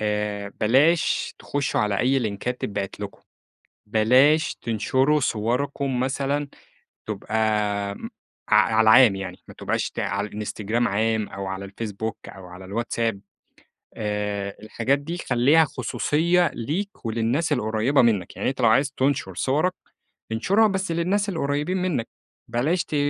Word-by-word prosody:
آآ 105 Hz, -1 st, -2 dB
بلاش 140 Hz, +10 st, +3 dB
تخُشّوا 145 Hz, -1 st, -1 dB
على 105 Hz, -2 st, 0 dB
أي 135 Hz, +2 st, +3 dB
لينكات 120 Hz, +2 st, -3 dB
تتبعت 100 Hz, -1 st, -4 dB
لكم، 100 Hz, -1 st, -7 dB, 0.7 s
بلاش 130 Hz, +9 st, +4 dB
تنشروا 130 Hz, +7 st, +1 dB
صوركم 125 Hz, +3 st, -1 dB
مثلًا 140 Hz, +2 st, -1 dB, 0.6 s
تبقى 110 Hz, +1 st, -4 dB, 0.6 s
م 225 Hz, -, -8 dB, 0.4 s
ع 105 Hz, -, +5 dB, 0.2 s
على 110 Hz, -, +4 dB
العام 110 Hz, -2 st, +7 dB
يعني 95 Hz, -2 st, -6 dB
ما -, -, -11 dB
تبقاش -, -, -2 dB
ت -, -, -12 dB
على 100 Hz, +2 st, -2 dB
الإنستجرام 105 Hz, +2 st, -2 dB
عام 110 Hz, +1 st, 0 dB
أو 100 Hz, 0 st, -6 dB
على 95 Hz, +1 st, -4 dB
الفيسبوك 105 Hz, +2 st, -5 dB
أو 95 Hz, -2 st, -11 dB
على 90 Hz, +1 st, -11 dB
الواتساب، 115 Hz, +1 st, -2 dB, 0.7 s
آآ 105 Hz, -2 st, -3 dB
الحاجات 120 Hz, +5 st, 0 dB
دي 165 Hz, +5 st, -5 dB
خلّيها 140 Hz, +6 st, +4 dB
خصوصية 170 Hz, +4 st, +1 dB
ليك 170 Hz, -, -4 dB
وللناس 120 Hz, +8 st, 0 dB
القريّبة 120 Hz, +2 st, +2 dB
منّك. 105 Hz, -7 st, +1 dB
يعني -, -, -1 dB
أنت 130 Hz, -, -6 dB
لو 115 Hz, -, +5 dB
عايز 135 Hz, +5 st, +3 dB
تنشُر 135 Hz, -8 st, 0 dB
صورك، 150 Hz, -, +1 dB, 0.6 s
انشرها 200 Hz, -, +3 dB
بس 190 Hz, -3 st, -2 dB
للناس 195 Hz, +5 st, 0 dB
القريبين 150 Hz, +2 st, -1 dB
منّك، 160 Hz, -11 st, -1 dB, 0.4 s
بلاش 145 Hz, +10 st, 0 dB
ت -, -, -7 dB
120 Hz, 135 wpm, -24 LUFS, 105-145 Hz, 0.7 s, العام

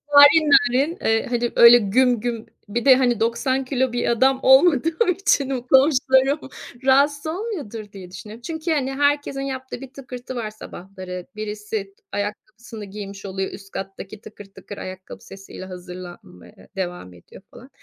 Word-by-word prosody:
Narin 295 Hz, +2 st, +8 dB
narin, 270 Hz, +9 st, +3 dB
eee, 225 Hz, 0 st, +1 dB
hani, 240 Hz, -1 st, -1 dB
öyle 235 Hz, +1 st, +9 dB
güm 240 Hz, +3 st, +2 dB
güm 235 Hz, -1 st, -4 dB, 0.2 s
bir 235 Hz, +4 st, -3 dB
de 260 Hz, -2 st, +8 dB
hani 245 Hz, -3 st, +1 dB
90 260 Hz, +4 st, 0 dB
kilo 260 Hz, -2 st, -1 dB
bir 240 Hz, -, -1 dB
adam 260 Hz, +3 st, +2 dB
olmadığım 320 Hz, -, +4 dB
için, 295 Hz, -7 st, +1 dB
komşularım 265 Hz, +1 st, +3 dB, 0.5 s
rahatsız 285 Hz, +3 st, +3 dB
olmuyordur 315 Hz, -, -5 dB
diye 185 Hz, -2 st, -11 dB
düşünüyorum. 210 Hz, +5 st, -10 dB
Çünkü, 320 Hz, +5 st, -4 dB
hani, 270 Hz, -3 st, 0 dB
herkesin 285 Hz, -1 st, 0 dB
yaptığı 260 Hz, -1 st, -6 dB
bir 265 Hz, -1 st, -11 dB
tıkırtı 255 Hz, -1 st, -9 dB
var 220 Hz, -3 st, -4 dB
sabahları. 185 Hz, -3 st, -9 dB
Birisi 210 Hz, -1 st, -5 dB
t -, -, -36 dB
ayakkabısını 210 Hz, +2 st, -6 dB
giymiş 200 Hz, 0 st, -9 dB
oluyor, 190 Hz, 0 st, -4 dB
üst 195 Hz, 0 st, -12 dB
kattaki 195 Hz, +2 st, -8 dB
tıkır 210 Hz, -1 st, -12 dB
tıkır 195 Hz, +1 st, -12 dB
ayakkabı 185 Hz, 0 st, -9 dB
sesiyle 195 Hz, -1 st, -11 dB
hazırlanmaya 180 Hz, -, -12 dB
devam 175 Hz, -, -5 dB
ediyor 90 Hz, -, -16 dB
falan. 255 Hz, -, -14 dB
240 Hz, 150 wpm, -22 LUFS, 200-270 Hz, 0.5 s, öyle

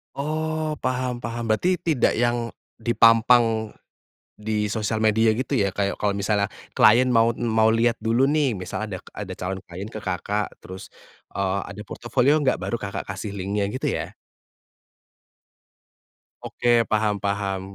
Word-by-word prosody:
Oh, 155 Hz, +2 st, -2 dB
paham 125 Hz, -1 st, -2 dB
paham, 120 Hz, 0 st, -5 dB
berarti 115 Hz, +12 st, +1 dB
tidak 160 Hz, -7 st, +1 dB
yang 120 Hz, 0 st, 0 dB, 0.3 s
dipampang 115 Hz, -1 st, +4 dB, 0.6 s
di 105 Hz, 0 st, -2 dB
sosial 110 Hz, 0 st, -1 dB
media 110 Hz, +1 st, +3 dB
gitu 130 Hz, +2 st, -3 dB
ya, 100 Hz, -7 st, +2 dB
kayak 100 Hz, +1 st, -2 dB
kalau 100 Hz, -1 st, 0 dB
misalnya 100 Hz, 0 st, 0 dB, 0.2 s
klien 120 Hz, +4 st, +6 dB
maut 115 Hz, 0 st, +3 dB
mau 110 Hz, -2 st, +2 dB
lihat 115 Hz, +1 st, +3 dB
dulu 115 Hz, +4 st, +2 dB
nih 140 Hz, -6 st, +1 dB
misalnya 95 Hz, +2 st, -5 dB
adak -, -, -15 dB
ada 100 Hz, -3 st, -6 dB
calon 95 Hz, +1 st, -4 dB
klien 90 Hz, +3 st, -8 dB
ke 110 Hz, 0 st, -8 dB
Kakak 100 Hz, +3 st, -2 dB
terus, 95 Hz, +1 st, -10 dB, 0.5 s
eee, 100 Hz, 0 st, 0 dB
"Ada -, -, -8 dB
portofolio 145 Hz, +5 st, +1 dB
enggak?" 135 Hz, -3 st, +2 dB
Baru 120 Hz, -, -4 dB
Kakak 100 Hz, -, -5 dB
kasih 100 Hz, +1 st, -6 dB
link-nya, 100 Hz, +1 st, -1 dB
gitu 130 Hz, -, -4 dB
ya? -, -, -2 dB, 2.3 s
Oke, 120 Hz, -1 st, +2 dB
paham 105 Hz, -1 st, +2 dB
paham. 100 Hz, -1 st, -1 dB
110 Hz, 140 wpm, -24 LUFS, 100-120 Hz, 2.3 s, klien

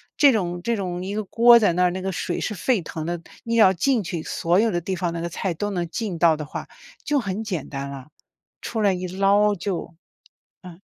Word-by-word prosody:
这 285 Hz, -2 st, +6 dB
种 175 Hz, -5 st, -1 dB
这 235 Hz, +3 st, 0 dB
种 180 Hz, -3 st, -4 dB
一 195 Hz, +2 st, -4 dB
个 215 Hz, -, -1 dB
锅 235 Hz, +4 st, +6 dB
在 205 Hz, -6 st, +3 dB
那 180 Hz, +2 st, +2 dB
儿， 180 Hz, -, +3 dB
那 185 Hz, +1 st, -4 dB
个 190 Hz, +1 st, -2 dB
水 175 Hz, -1 st, -3 dB
是 -, -, -2 dB
沸 210 Hz, +2 st, 0 dB
腾 160 Hz, 0 st, -6 dB
的， 175 Hz, 0 st, -3 dB, 0.2 s
你 230 Hz, 0 st, -2 dB
要 200 Hz, -4 st, +6 dB
浸 235 Hz, +5 st, +1 dB
去 170 Hz, -2 st, -4 dB
所 170 Hz, +3 st, 0 dB
有 225 Hz, +2 st, +3 dB
的 175 Hz, -, 0 dB
地 185 Hz, +3 st, -3 dB
方 175 Hz, -1 st, -2 dB
那 170 Hz, -, -4 dB
个 170 Hz, -, -2 dB
菜 180 Hz, +1 st, -3 dB
都 205 Hz, +5 st, -3 dB
能 175 Hz, -3 st, -2 dB
浸 190 Hz, -2 st, -4 dB
到 165 Hz, -2 st, +4 dB
的 150 Hz, -, -5 dB
话， 145 Hz, -, -7 dB, 0.4 s
就 295 Hz, -1 st, +1 dB
很 205 Hz, -1 st, -3 dB
简 180 Hz, -9 st, -4 dB
单 140 Hz, -1 st, -5 dB
了， 135 Hz, 0 st, -9 dB, 0.5 s
出 225 Hz, -, -4 dB
来 200 Hz, -3 st, +3 dB
一 180 Hz, 0 st, -4 dB
捞 200 Hz, +3 st, +3 dB
就 175 Hz, -2 st, -4 dB, 0.7 s
嗯。 180 Hz, 0 st, -12 dB
185 Hz, 250 characters per minute, -23 LUFS, 170-210 Hz, 0.7 s, 这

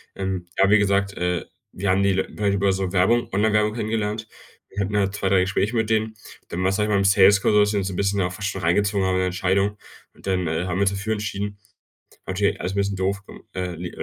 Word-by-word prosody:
Ähm, 95 Hz, -2 st, -3 dB
aber, 100 Hz, +1 st, +5 dB
wie 110 Hz, -, +7 dB
gesagt, 100 Hz, 0 st, +1 dB
äh, 90 Hz, 0 st, -1 dB, 0.3 s
wir 95 Hz, +1 st, -3 dB
haben 95 Hz, +1 st, +3 dB
die 95 Hz, -1 st, +2 dB
wir 95 Hz, -, +2 dB
haben 105 Hz, -1 st, -2 dB
die 100 Hz, -, +1 dB
über 100 Hz, 0 st, +2 dB
so 95 Hz, -1 st, -2 dB
Werbung 100 Hz, +6 st, +2 dB
Online-Werbung 105 Hz, +1 st, +2 dB
kennengelernt. 110 Hz, -1 st, -2 dB, 0.4 s
Wir 100 Hz, 0 st, -2 dB
hatten 105 Hz, +2 st, -2 dB
halt 100 Hz, -1 st, +1 dB
2, 95 Hz, -, -1 dB
3 95 Hz, -1 st, +4 dB
Gespräche 100 Hz, +5 st, 0 dB
mit 110 Hz, -1 st, 0 dB
denen. 110 Hz, 0 st, 0 dB, 0.3 s
Dann 90 Hz, -, -3 dB
war, 95 Hz, -, +2 dB
sage 105 Hz, +1 st, 0 dB
ich -, -, -3 dB
mal 100 Hz, -, +3 dB
im 100 Hz, -, +1 dB
Sales-Call, 100 Hz, +1 st, +5 dB
da -, -, +4 dB
haben 105 Hz, -, +6 dB
sie 105 Hz, 0 st, -1 dB
uns 95 Hz, -1 st, -1 dB
'n 90 Hz, -, -6 dB
bisschen 100 Hz, +1 st, 0 dB
auch 90 Hz, 0 st, -1 dB
fast 100 Hz, 0 st, -3 dB
schon 95 Hz, -, -5 dB
reingezogen 100 Hz, +3 st, +1 dB
haben 95 Hz, -, +1 dB
in 95 Hz, -, +1 dB
der 95 Hz, -, +1 dB
Entscheidung. 95 Hz, +3 st, 0 dB, 0.4 s
Und -, -, -14 dB
dann, 90 Hz, -2 st, 0 dB
äh, 80 Hz, +3 st, -1 dB
haben 90 Hz, -, -2 dB
wir -, -, +1 dB
uns 100 Hz, -, +4 dB
dafür 100 Hz, +3 st, -2 dB
entschieden. 105 Hz, -1 st, -4 dB, 0.7 s
Natürlich 95 Hz, +2 st, 0 dB
alles 90 Hz, +2 st, -2 dB
'n -, -, -6 dB
bisschen 100 Hz, 0 st, 0 dB
doof, 95 Hz, +1 st, -1 dB, 0.3 s
äh, 95 Hz, -, -3 dB
äh, 85 Hz, +2 st, -6 dB
äh, -, -, -12 dB
100 Hz, 260 wpm, -23 LUFS, 95-105 Hz, 0.7 s, wie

